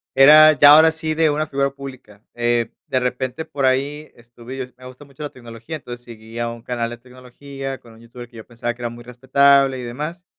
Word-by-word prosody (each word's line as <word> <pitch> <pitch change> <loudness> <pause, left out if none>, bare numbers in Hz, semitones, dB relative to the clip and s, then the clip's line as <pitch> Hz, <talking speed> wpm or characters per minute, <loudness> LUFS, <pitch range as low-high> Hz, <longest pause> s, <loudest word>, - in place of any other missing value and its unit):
era 155 +3 +8
ya 145 0 +7
ahora 160 +1 +6
sí, 160 0 -3
de 160 -1 +2
una 150 +1 -1
figura 140 -1 -1
pública, 130 -7 -12
eh, 120 -1 -1
de 130 - 0
repente 130 +4 -3
por 140 - -5
ahí 140 +4 -1
estuve 120 +2 -12
y - - -7
es 125 -1 -8
me 130 - -15
gusta 130 +3 -13
mucho 140 +2 -12
la 145 - -4
tecnología. 120 +4 -9
Entonces 120 -3 -10
seguía 115 0 -7
a 115 - -4
un 115 -1 -13
canal 120 -2 -3
de 120 - -8
tecnología 130 +2 -9
con 115 -1 -18
un 110 - -18
youtuber 120 +1 -12
que 120 - -22
yo 110 - -11
pensaba 120 0 -5
que 120 - -16
era 120 - -3
muy 120 0 -12
respetable 135 +2 +3
y - - -7
demás, 150 +9 -6
130 Hz, 230 wpm, -20 LUFS, 120-140 Hz, -, era